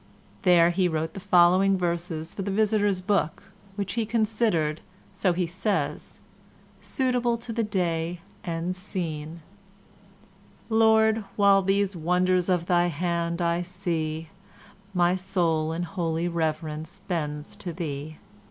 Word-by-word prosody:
There 175 Hz, -2 st, +5 dB
he 180 Hz, +1 st, +2 dB
wrote 160 Hz, -1 st, -2 dB
the -, -, -6 dB
following 185 Hz, 0 st, +4 dB
verses 170 Hz, -2 st, -3 dB
for -, -, -5 dB
the 195 Hz, -, -3 dB
visitors' 205 Hz, -2 st, +2 dB
book, 190 Hz, -1 st, -1 dB, 0.2 s
which 200 Hz, -2 st, -3 dB
he 230 Hz, +1 st, 0 dB
considered, 215 Hz, -8 st, 0 dB, 0.3 s
so 185 Hz, -, +1 dB
he 175 Hz, +1 st, 0 dB
says, 195 Hz, +4 st, -2 dB, 0.6 s
"suitable 245 Hz, -3 st, 0 dB
to 230 Hz, 0 st, -6 dB
the 230 Hz, -, 0 dB
day 175 Hz, -5 st, -1 dB, 0.2 s
and 170 Hz, +1 st, -2 dB
scene":— 165 Hz, -4 st, -5 dB, 1.3 s
Lord, 220 Hz, 0 st, +4 dB
while 200 Hz, -1 st, +5 dB
these 195 Hz, 0 st, +1 dB
wonders 180 Hz, +2 st, +1 dB
of 175 Hz, -2 st, +1 dB
thy 175 Hz, 0 st, +3 dB
hand 170 Hz, +1 st, -1 dB
I 170 Hz, +1 st, +1 dB
see, 165 Hz, -3 st, -3 dB, 0.6 s
My 180 Hz, -1 st, +3 dB
soul 170 Hz, -4 st, 0 dB
in 165 Hz, +2 st, -2 dB
holy 170 Hz, -1 st, -2 dB
reverence 160 Hz, +1 st, -3 dB
bends 150 Hz, -3 st, -3 dB
to 175 Hz, -, -5 dB
thee. 155 Hz, -2 st, -5 dB
180 Hz, 125 wpm, -26 LUFS, 165-195 Hz, 1.3 s, There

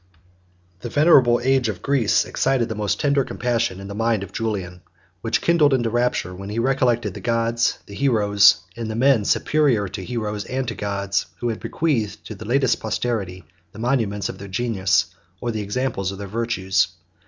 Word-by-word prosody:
The 120 Hz, -, -6 dB
venerable 130 Hz, -5 st, +5 dB
age 130 Hz, -2 st, +2 dB
of 95 Hz, -5 st, -6 dB
Greece 135 Hz, -7 st, +2 dB
excited 130 Hz, -3 st, 0 dB
the -, -, -2 dB
most 105 Hz, -2 st, -1 dB
tender 140 Hz, -1 st, +2 dB
compassion 115 Hz, -7 st, -1 dB
in 100 Hz, -, -8 dB
the 100 Hz, -, -6 dB
mind 115 Hz, -1 st, 0 dB
of 100 Hz, -, -9 dB
Julian, 95 Hz, -5 st, -4 dB, 0.4 s
which 115 Hz, -, 0 dB
kindled 155 Hz, -5 st, +4 dB
into 120 Hz, -3 st, -1 dB
rapture 120 Hz, -6 st, 0 dB
when 100 Hz, +2 st, -8 dB
he 105 Hz, -, -5 dB
recollected 120 Hz, -4 st, +1 dB
the -, -, -8 dB
gods, 115 Hz, 0 st, +1 dB
the 100 Hz, -, -12 dB
heroes, 100 Hz, -6 st, +4 dB
and 115 Hz, -1 st, -5 dB
the 110 Hz, -, -3 dB
men 125 Hz, -3 st, +3 dB
superior 135 Hz, -9 st, +2 dB
to 95 Hz, 0 st, -6 dB
heroes 105 Hz, -2 st, -3 dB
and 130 Hz, 0 st, -3 dB
to -, -, -3 dB
gods, 100 Hz, -2 st, -2 dB
who 120 Hz, -, -2 dB
have 110 Hz, -, -3 dB
bequeathed 125 Hz, -11 st, -2 dB
to -, -, -7 dB
the 110 Hz, +1 st, -10 dB
latest 130 Hz, +2 st, +2 dB
posterity 95 Hz, -8 st, -3 dB, 0.3 s
the -, -, -12 dB
monuments 110 Hz, -4 st, 0 dB
of -, -, -7 dB
their 100 Hz, -, -8 dB
genius, 95 Hz, -3 st, +1 dB, 0.3 s
or 120 Hz, -, -2 dB
the 110 Hz, -1 st, -3 dB
example 120 Hz, +2 st, -2 dB
of 95 Hz, 0 st, -3 dB
their 100 Hz, -, -6 dB
virtues. 95 Hz, -4 st, 0 dB
115 Hz, 185 wpm, -22 LUFS, 100-125 Hz, 0.4 s, venerable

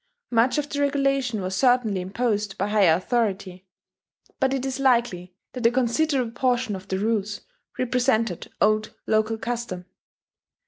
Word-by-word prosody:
Much 240 Hz, +4 st, +3 dB
of 295 Hz, -1 st, -1 dB
the 285 Hz, 0 st, -3 dB
regulation 275 Hz, -5 st, +1 dB
was 185 Hz, +1 st, -3 dB
certainly 245 Hz, -4 st, +2 dB
imposed 205 Hz, +1 st, -2 dB
by 200 Hz, -, 0 dB
higher 200 Hz, -6 st, +4 dB
authority; 195 Hz, -2 st, -2 dB, 0.7 s
but 265 Hz, -1 st, +2 dB
it 270 Hz, -1 st, -1 dB
is 265 Hz, 0 st, -3 dB
likely 235 Hz, -9 st, +1 dB, 0.2 s
that 245 Hz, -2 st, +2 dB
a -, -, +5 dB
considerable 255 Hz, +1 st, +1 dB
portion 250 Hz, -3 st, 0 dB
of 190 Hz, 0 st, -9 dB
the 190 Hz, -, -1 dB
rules 210 Hz, 0 st, -1 dB, 0.4 s
represented 235 Hz, -6 st, 0 dB
old 215 Hz, +1 st, +1 dB
local 220 Hz, +1 st, +1 dB
custom. 230 Hz, -6 st, -4 dB
230 Hz, 140 wpm, -24 LUFS, 200-255 Hz, 0.7 s, a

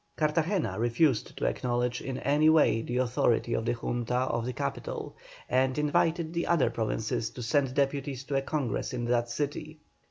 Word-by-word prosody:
Cartagena 155 Hz, -, 0 dB
refused 120 Hz, +2 st, +1 dB
to -, -, -2 dB
acknowledge 120 Hz, 0 st, -1 dB
in 135 Hz, -1 st, -4 dB
any 150 Hz, +4 st, +3 dB
way 155 Hz, -8 st, +4 dB
the 120 Hz, +2 st, -3 dB
authority 120 Hz, -2 st, +1 dB
of 115 Hz, -, -1 dB
the -, -, +1 dB
Junta 120 Hz, 0 st, -2 dB
of 120 Hz, -2 st, 0 dB
the -, -, -1 dB
capital, -, -, -4 dB, 0.3 s
and 130 Hz, +1 st, +1 dB
invited 160 Hz, +2 st, +1 dB
the 170 Hz, 0 st, -1 dB
other 160 Hz, -9 st, +3 dB
provinces 110 Hz, 0 st, -2 dB
to 125 Hz, -, -8 dB
send 135 Hz, +1 st, +1 dB
deputies 140 Hz, -1 st, -1 dB
to 140 Hz, -, -4 dB
a -, -, +2 dB
Congress 135 Hz, -6 st, -2 dB
in 120 Hz, -1 st, -2 dB
that 120 Hz, 0 st, +1 dB
city. 145 Hz, +4 st, -4 dB
130 Hz, 170 wpm, -29 LUFS, 120-150 Hz, 0.3 s, way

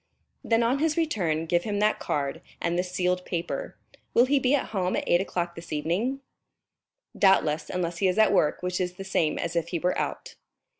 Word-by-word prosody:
"Then 230 Hz, 0 st, +2 dB
on 250 Hz, +4 st, +1 dB
his 315 Hz, +1 st, +1 dB
return 175 Hz, -, 0 dB
give 175 Hz, +1 st, +2 dB
him 205 Hz, -2 st, -2 dB
that 210 Hz, +1 st, +2 dB
card 145 Hz, +3 st, -2 dB, 0.2 s
and 170 Hz, 0 st, -1 dB
this 180 Hz, +1 st, -1 dB
sealed 180 Hz, 0 st, 0 dB
paper. 170 Hz, -1 st, -4 dB, 0.4 s
Will 240 Hz, -, +6 dB
he 280 Hz, +2 st, +3 dB
be 265 Hz, +2 st, +3 dB
at 275 Hz, -, -2 dB
home 185 Hz, -4 st, -1 dB
at -, -, -1 dB
eight 175 Hz, -, +4 dB
o'clock 175 Hz, -3 st, -2 dB
this 170 Hz, 0 st, -11 dB
evening?" 185 Hz, -, -1 dB, 0.9 s
"Doubtless, 160 Hz, -6 st, +3 dB
unless 175 Hz, -1 st, -2 dB
he 195 Hz, -, +3 dB
is 185 Hz, -, 0 dB
at 220 Hz, -, +5 dB
work, 150 Hz, +3 st, +2 dB
which 180 Hz, 0 st, -1 dB
is 180 Hz, -1 st, -2 dB
the 195 Hz, -, -8 dB
same 165 Hz, -5 st, 0 dB
as 170 Hz, 0 st, -3 dB
if 170 Hz, -1 st, 0 dB
he 170 Hz, -, -2 dB
were 180 Hz, +2 st, 0 dB
out." -, -, -4 dB
180 Hz, 205 wpm, -27 LUFS, 170-215 Hz, 0.9 s, Will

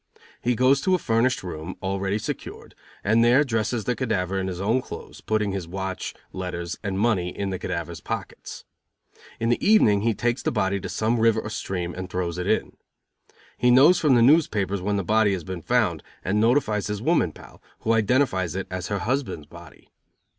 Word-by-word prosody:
He 120 Hz, +1 st, +1 dB
goes 130 Hz, +3 st, +4 dB
to 185 Hz, +4 st, +3 dB
a -, -, +2 dB
furnished 120 Hz, -, +1 dB
room, 85 Hz, 0 st, -6 dB
already 95 Hz, +1 st, -1 dB
secured, 105 Hz, -, -6 dB, 0.3 s
and 110 Hz, +3 st, +3 dB
there 125 Hz, +5 st, +5 dB
dresses 115 Hz, -3 st, -1 dB
the 125 Hz, -, 0 dB
cadaver 95 Hz, -6 st, -1 dB
in 95 Hz, -, -2 dB
his 90 Hz, -2 st, -4 dB
own 110 Hz, +6 st, +1 dB
clothes, -, -, -10 dB
putting 105 Hz, -2 st, 0 dB
his 95 Hz, -3 st, -4 dB
watch, 95 Hz, +1 st, -4 dB, 0.2 s
letters 90 Hz, -2 st, -4 dB
and 100 Hz, -3 st, -3 dB
money 100 Hz, -5 st, +1 dB
in 100 Hz, +2 st, -4 dB
the 95 Hz, -, -3 dB
cadavers -, -, -4 dB
pockets. -, -, -6 dB, 0.7 s
In 115 Hz, -, 0 dB
the 120 Hz, -, +1 dB
evening 110 Hz, -, +5 dB
he 115 Hz, 0 st, +1 dB
takes 120 Hz, +1 st, 0 dB
the -, -, -1 dB
body 95 Hz, +1 st, 0 dB
to 95 Hz, -, -6 dB
some 110 Hz, +5 st, 0 dB
river 115 Hz, -1 st, +3 dB
or 105 Hz, -, -6 dB
stream 90 Hz, -4 st, -3 dB
and 95 Hz, +1 st, -6 dB
throws 90 Hz, -1 st, -3 dB
it 90 Hz, -, -3 dB
in. -, -, 0 dB, 0.8 s
He 125 Hz, -, +4 dB
knows 145 Hz, +9 st, +6 dB
from 145 Hz, -5 st, +4 dB
the 120 Hz, -, +5 dB
newspapers 105 Hz, -, +3 dB
when 100 Hz, +2 st, 0 dB
the 100 Hz, -, -1 dB
body 105 Hz, +2 st, +3 dB
has 90 Hz, -3 st, -3 dB
been 95 Hz, -1 st, -6 dB
found, -, -, +1 dB, 0.2 s
and 105 Hz, +3 st, +1 dB
notifies 110 Hz, -4 st, +2 dB
his 105 Hz, -1 st, -3 dB
woman 125 Hz, -, +2 dB
pal, -, -, -15 dB, 0.2 s
who 115 Hz, -, +1 dB
identifies 110 Hz, -5 st, +1 dB
it 95 Hz, -, -3 dB
as 90 Hz, 0 st, -4 dB
her 100 Hz, -, -1 dB
husband's 125 Hz, -, -2 dB
body. 85 Hz, +2 st, -15 dB
105 Hz, 195 wpm, -24 LUFS, 95-120 Hz, 0.8 s, knows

